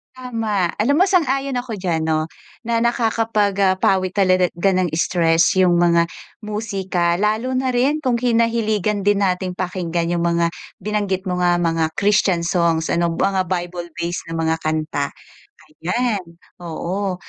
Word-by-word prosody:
Tama. 225 -8 -2
Alam 280 +7 +2
mo, 375 - +6
sang-ayon 275 -7 +1
ako 245 -3 -4
diyan, 175 -4 -1
'no, 155 -1 0 0.4
na 230 0 0
nakakapag 225 -3 +1
ah, 190 -1 +4
pawi 185 0 +2
talaga 185 -2 +2
gan 185 +1 +2
ng 180 - 0
stress 165 -1 +3
yung 180 -2 +4
mga 170 -1 +3 0.3
musika. 195 -5 -1
Lalo 215 +6 0
na 260 0 0
rin 265 +5 +1
kung 255 -4 +1
kinahiligan 225 -4 +1
din 205 0 +3
nating 185 -1 0
pakinggan 175 -2 -2
yung 170 - 0
mga 170 0 +2 0.3
binanggit 200 -2 -1
mo 180 - -1
nga, 175 -1 +3
mga 165 -1 0
Christian 200 -3 +2
songs 170 -2 +1
ano, 170 0 +1
mga 190 +2 0
Bible-based 175 -1 -4
na - - -5
mga 160 0 +1
kanta. 155 -2 -1 0.7
Ayan, 205 +3 -1 0.3
oo, 180 +3 -3
185 Hz, 145 wpm, -20 LUFS, 170-220 Hz, 0.7 s, mo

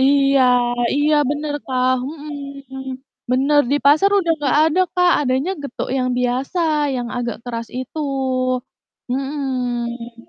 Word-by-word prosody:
Iya 275 0 +4 0.5
iya 295 +2 +3 0.2
bener 295 0 -2
Kak, 255 -1 +1 0.2
mhm. 280 -3 -8 0.5
Bener, 280 +3 +4
di 290 - +4
pasar 305 +8 +5
udah 335 -3 +2
nggak 285 -1 +1
ada 320 +4 +2
Kak, 360 0 +4
adanya 265 +5 0
getuk 280 - -5
yang 255 -1 0
biasa 250 +7 -1 0.4
yang 245 -1 -3
agak 240 -2 -2
keras 230 -2 -5
itu 260 +5 -7 1.1
mhm. 245 -4 -3
275 Hz, 125 wpm, -20 LUFS, 250-295 Hz, 1.1 s, pasar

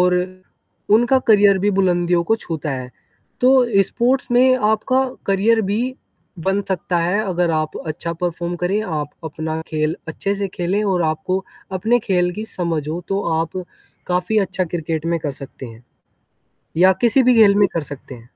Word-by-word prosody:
और। 180 0 +4 0.8
उनका 240 +4 +4
करियर 205 -2 +6
भी 205 +2 +1
बुलंदियों 175 -2 +2
को 225 - +2
छूता 160 -7 -5
है। 130 -1 -5 0.5
तो 255 - +5 0.3
स्पोर्ट्स 250 +5 0
में 255 +1 +5
आपका 220 +5 +2 0.3
करियर 205 +4 +3
भी 220 +4 +1 0.6
बन 195 +1 +2
सकता 180 -1 -1
है 180 +5 +1
अगर 180 -3 0
आप 155 -1 -1
अच्छा 165 +2 -4
परफ़ॉर्म 175 0 -2
करें 180 +4 0
आप 150 -7 -3
अपना 160 0 -4
खेल 155 0 -1
अच्छे 195 +5 -2
से 200 -1 -2
खेलें 185 +4 0
और 185 -3 +1
आपको 170 +5 -1 0.4
अपने 235 +4 +3
खेल 180 -2 +1
की 215 - -5
समझ 170 -7 -3
हो 165 +3 -3
तो 195 +1 0 0.2
आप 180 +3 -3 0.5
काफ़ी 180 +4 +1
अच्छा 190 -2 0
क्रिकेट 165 -1 -3
में 170 0 0
कर 145 -2 -3
सकते 135 0 -9
हैं। 115 +1 -13 0.9
या 185 +2 +6
किसी 245 +2 +4
भी 250 - +5
घेल 210 -3 +6
में 205 -1 +5
कर 165 - -1
सकते 135 -1 -11
हैं। 115 0 -15
180 Hz, 170 wpm, -20 LUFS, 160-205 Hz, 0.9 s, करियर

